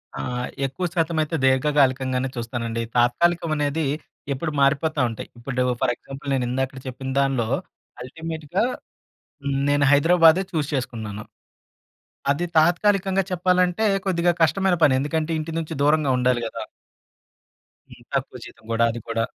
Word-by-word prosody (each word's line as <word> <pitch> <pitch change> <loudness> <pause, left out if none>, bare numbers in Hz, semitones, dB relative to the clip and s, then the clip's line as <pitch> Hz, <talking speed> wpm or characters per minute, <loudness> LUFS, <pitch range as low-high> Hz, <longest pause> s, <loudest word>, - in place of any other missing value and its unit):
ఆ! - - -6 0.5
ఎక్కువ 135 +7 -3
శాతం 165 -2 0
అయితే 155 +1 -2
దీర్ఘకాలికంగానే 130 -1 +2
చూస్తానండి. 115 -1 -3 0.2
తాత్కాలికం 165 +8 +2
అనేది 150 +1 0 0.5
ఎప్పుడు 155 +4 -3
మారిపోతా 145 +2 +2
ఉంటాయి. 115 - -7
ఇప్పుడు 125 +1 -2 0.2
ఫర్ 125 - +2
ఎగ్జాంపుల్ 135 +2 -9
నేను 125 -2 0
ఇందాక 130 +1 -2
చెప్పిన 130 +1 -6
దాంట్లో 135 -4 +1 0.6
అల్టిమేట్‌గా 160 - -3 0.8
హ్మ్, 140 -1 -1
నేను 145 0 +3
హైదరాబాదే 165 +4 +5
చూజ్ 155 -5 -1
చేసుకున్నాను. 110 -6 -4 1.1
అది 145 +5 0
తాత్కాలికంగా 190 +3 +3
చెప్పాలంటే, 180 +2 +2 0.2
కొద్దిగా 175 -2 +2
కష్టమైన 180 +4 +3
పని. 145 -4 +6
ఎందుకంటే, 155 +3 -1
ఇంటి 155 +1 -4
నుంచి 165 0 -4
దూరంగా 150 -1 +3
ఉండాలి 125 -1 +2
కదా! 115 0 -6 1.3
హ్మ్. - - -15
తక్కువ - - -2
జీతం - - -14
కూడా 115 +1 +3
అది 120 - -6
కూడా. 115 0 0
145 Hz, 130 wpm, -23 LUFS, 130-165 Hz, 1.3 s, పని